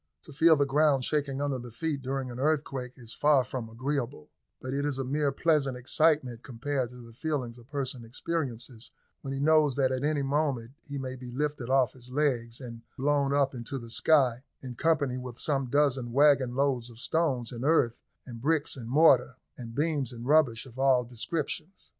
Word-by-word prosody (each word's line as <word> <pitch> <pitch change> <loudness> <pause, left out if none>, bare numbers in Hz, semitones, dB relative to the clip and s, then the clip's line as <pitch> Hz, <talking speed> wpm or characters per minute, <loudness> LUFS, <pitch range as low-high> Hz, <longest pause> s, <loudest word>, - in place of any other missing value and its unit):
To 150 - -12
feel 160 +3 +6
the 140 -1 +2
ground 140 -2 +3
shaking 140 -2 -1
under 140 -3 -1
the 120 0 -8
feet 140 +4 -3
during 135 -1 -3
an 120 - -7
earthquake 135 -4 -1
is 115 -3 -10
far 145 -3 +4
from 125 -2 -5
agreeable, 125 - -3 0.3
but 130 0 -5
it 140 +1 -1
is 145 -2 -1
a 135 - -1
mere 140 +2 0
pleasant 140 -3 +1
excitement 130 -2 +1
compared 130 0 -3
to 125 -1 -12
the 115 - -14
feelings 125 -3 -3
a - - -14
person 130 -1 -4
experiences, 125 -2 -4 0.3
when 135 - -5
he 135 - -3
knows 150 -2 +4
that 135 -2 +2
at 130 +1 -2
any 150 -1 +1
moment 135 -4 0 0.2
he 145 0 -5
may 130 -1 -4
be 125 -1 -9
lifted 140 -1 -3
off 130 -2 +3
his 125 -1 -13
legs 125 -4 0
and 115 -3 -8 0.2
blown 140 0 +1
up 140 -1 +2
into 125 +3 -5
the 115 -2 -8
sky 130 -4 +3 0.2
in 125 -2 -6
company 140 -2 +1
with 125 -2 -8
some 135 -4 0
dozen 135 -3 +1
wagon 140 -2 +4
loads 130 -3 0
of 115 - -14
stones 130 -3 0
and 120 0 -6
earth, 135 -6 +2 0.2
and 120 -3 -9
bricks 150 +2 +1
and 120 -4 -8
mortar, 155 +6 +5 0.2
and 115 -3 -9
beams 145 -4 0
and 120 -1 -8
rubbish 140 -6 +3
of 130 0 -12
all 135 -2 +4
descriptions. 150 - -5
135 Hz, 195 wpm, -29 LUFS, 125-145 Hz, 0.3 s, feel